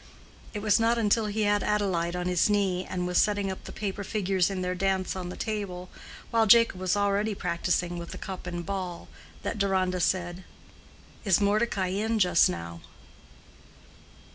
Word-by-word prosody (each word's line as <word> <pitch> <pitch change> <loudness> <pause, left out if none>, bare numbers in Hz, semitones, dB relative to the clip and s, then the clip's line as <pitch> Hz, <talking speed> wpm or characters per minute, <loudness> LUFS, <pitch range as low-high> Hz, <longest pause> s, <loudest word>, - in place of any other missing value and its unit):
It 205 - -4
was 215 0 +4
not 230 +1 +3
until 220 0 +2
he 215 +1 -1
had 205 0 +2
Adelaide 185 -5 0
on 180 0 -3
his 180 +2 +2
knee, 195 -3 +1
and 180 -1 -2
was 180 0 +3
setting 205 -2 0
up 190 - -8
the - - -7
paper 200 -1 -4
figures 195 -3 0
in 190 -2 -3
their 180 0 -1
dance 190 0 -1
on 180 -1 -5
the - - -6
table, 195 -5 -4 0.4
while 225 -1 +3
Jacob 230 -3 +6
was 185 +1 0
already 205 +1 +1
practicing 175 -1 -1
with 170 - -7
the - - -7
cup 185 -2 -7
and 175 -1 -4
ball, 185 -3 -5 0.3
that 215 - -3
Deronda 185 -2 +1
said, 175 +1 -1 0.8
"Is 190 -4 +3
Mordecai 205 -2 +1
in 220 +4 0
just 180 -4 +4
now?" 85 -1 -6
190 Hz, 170 wpm, -27 LUFS, 180-205 Hz, 0.8 s, Jacob